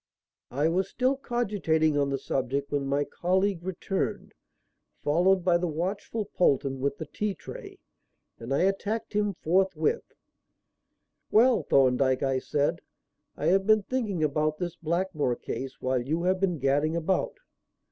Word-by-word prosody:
I 145 Hz, +5 st, +1 dB
was 185 Hz, +3 st, 0 dB
still 260 Hz, +4 st, +1 dB
cogitating 200 Hz, -, 0 dB
on 140 Hz, -1 st, +1 dB
the 135 Hz, -, -1 dB
subject 135 Hz, +1 st, -2 dB
when 140 Hz, -1 st, -1 dB
my 140 Hz, +1 st, +1 dB
colleague 185 Hz, +3 st, 0 dB
returned, 190 Hz, +2 st, -3 dB, 0.7 s
followed 180 Hz, +5 st, +3 dB
by 175 Hz, -2 st, +4 dB
the 175 Hz, -, -1 dB
watchful 190 Hz, +7 st, -3 dB
Polton 135 Hz, -7 st, +1 dB
with 140 Hz, +1 st, -1 dB
the 160 Hz, -, -5 dB
tea 205 Hz, +6 st, -3 dB
tray, -, -, -10 dB, 0.6 s
and 115 Hz, +3 st, -7 dB
I 140 Hz, -, +2 dB
attacked 200 Hz, +4 st, -1 dB
him 205 Hz, -2 st, 0 dB
forthwith. 190 Hz, -, 0 dB, 1.2 s
"Well, 230 Hz, -1 st, +5 dB
Thorndyke," 130 Hz, -2 st, +3 dB
I 135 Hz, -1 st, +1 dB
said, 145 Hz, +2 st, -1 dB, 0.6 s
"I -, -, -3 dB
have 195 Hz, +2 st, +2 dB
been 215 Hz, -1 st, +5 dB
thinking 210 Hz, -9 st, -2 dB
about 155 Hz, +1 st, +1 dB
this 175 Hz, 0 st, -4 dB
Blackmore 170 Hz, -6 st, -1 dB
case 135 Hz, +2 st, -6 dB
while 130 Hz, -1 st, 0 dB
you 155 Hz, +7 st, -2 dB
have 185 Hz, +1 st, +2 dB
been 180 Hz, -3 st, +1 dB
gadding 145 Hz, +4 st, +1 dB
about." 175 Hz, -, -1 dB
170 Hz, 145 wpm, -27 LUFS, 140-195 Hz, 1.2 s, Well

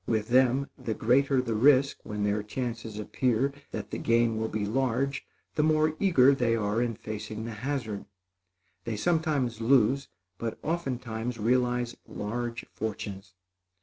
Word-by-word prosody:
With 110 Hz, -1 st, 0 dB
them, 130 Hz, +2 st, +4 dB
the 110 Hz, -, -3 dB
greater 130 Hz, +4 st, +3 dB
the 115 Hz, -2 st, -2 dB
risk 135 Hz, +4 st, +4 dB
when 105 Hz, -1 st, -4 dB
their 105 Hz, +1 st, +1 dB
chances 115 Hz, -1 st, -4 dB
appear 125 Hz, +4 st, 0 dB, 0.2 s
that -, -, -6 dB
the -, -, -3 dB
gain 115 Hz, -1 st, +2 dB
will 110 Hz, 0 st, -1 dB
be 110 Hz, -2 st, -2 dB
large, 130 Hz, +4 st, 0 dB, 0.3 s
the -, -, +1 dB
more 155 Hz, 0 st, +3 dB
eager 140 Hz, -9 st, +5 dB
they 120 Hz, -4 st, +2 dB
are 105 Hz, +1 st, 0 dB
in 120 Hz, -2 st, -1 dB
facing 110 Hz, +1 st, -6 dB
the 115 Hz, -, -4 dB
hazard. 110 Hz, -2 st, -3 dB, 0.8 s
They 115 Hz, -2 st, -3 dB
sometimes 150 Hz, -7 st, 0 dB
lose, 135 Hz, +3 st, +3 dB, 0.3 s
but 115 Hz, -1 st, -3 dB
oftentimes 125 Hz, -7 st, -3 dB
realize 120 Hz, +1 st, +1 dB
large 120 Hz, +3 st, -4 dB
fortunes. 100 Hz, -3 st, -5 dB
120 Hz, 145 wpm, -28 LUFS, 110-135 Hz, 0.8 s, eager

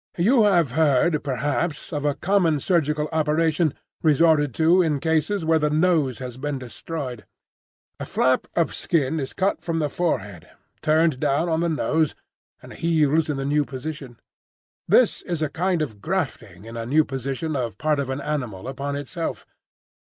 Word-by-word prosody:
You 220 Hz, +6 st, +4 dB
have 175 Hz, -, +3 dB
heard, 150 Hz, +2 st, +2 dB
perhaps, 145 Hz, +5 st, -2 dB
of 145 Hz, -1 st, -2 dB
a 145 Hz, -1 st, +1 dB
common 175 Hz, -5 st, +2 dB
surgical 150 Hz, -2 st, +1 dB
operation 155 Hz, 0 st, +1 dB, 0.3 s
resorted 155 Hz, -2 st, +4 dB
to 165 Hz, +3 st, +4 dB
in 155 Hz, -5 st, +1 dB
cases 160 Hz, +5 st, 0 dB
where 160 Hz, 0 st, +3 dB
the 150 Hz, 0 st, +1 dB
nose 155 Hz, -5 st, +2 dB
has 125 Hz, -2 st, -7 dB
been 145 Hz, +1 st, -3 dB
destroyed: 130 Hz, -1 st, -6 dB, 0.7 s
a -, -, -4 dB
flap 130 Hz, 0 st, +1 dB
of 170 Hz, -, +1 dB
skin 160 Hz, -2 st, 0 dB
is 135 Hz, -2 st, -4 dB
cut 195 Hz, +1 st, 0 dB
from 165 Hz, -1 st, -2 dB
the 150 Hz, -2 st, 0 dB
forehead, 100 Hz, -, -2 dB, 0.3 s
turned 155 Hz, -3 st, +2 dB
down 145 Hz, +3 st, +1 dB
on 160 Hz, 0 st, +1 dB
the 170 Hz, 0 st, +1 dB
nose, 160 Hz, -1 st, 0 dB, 0.5 s
and -, -, -11 dB
heals 160 Hz, -1 st, +2 dB
in 145 Hz, -, -1 dB
the 135 Hz, -, -3 dB
new 145 Hz, +1 st, +2 dB
position. 135 Hz, -2 st, -7 dB, 0.7 s
This -, -, +4 dB
is 170 Hz, -3 st, -3 dB
a 155 Hz, -, 0 dB
kind 175 Hz, +2 st, 0 dB
of 110 Hz, -9 st, -7 dB
grafting 115 Hz, -, -3 dB
in 115 Hz, +1 st, -9 dB
a 115 Hz, 0 st, -4 dB
new 150 Hz, +4 st, +3 dB
position 135 Hz, +4 st, -3 dB
of 120 Hz, -6 st, -3 dB
part 150 Hz, +2 st, +1 dB
of 135 Hz, -2 st, -2 dB
an 135 Hz, +1 st, -3 dB
animal 125 Hz, -11 st, -4 dB
upon 140 Hz, +2 st, -4 dB
itself. 145 Hz, +4 st, -4 dB
150 Hz, 165 wpm, -23 LUFS, 135-165 Hz, 0.7 s, You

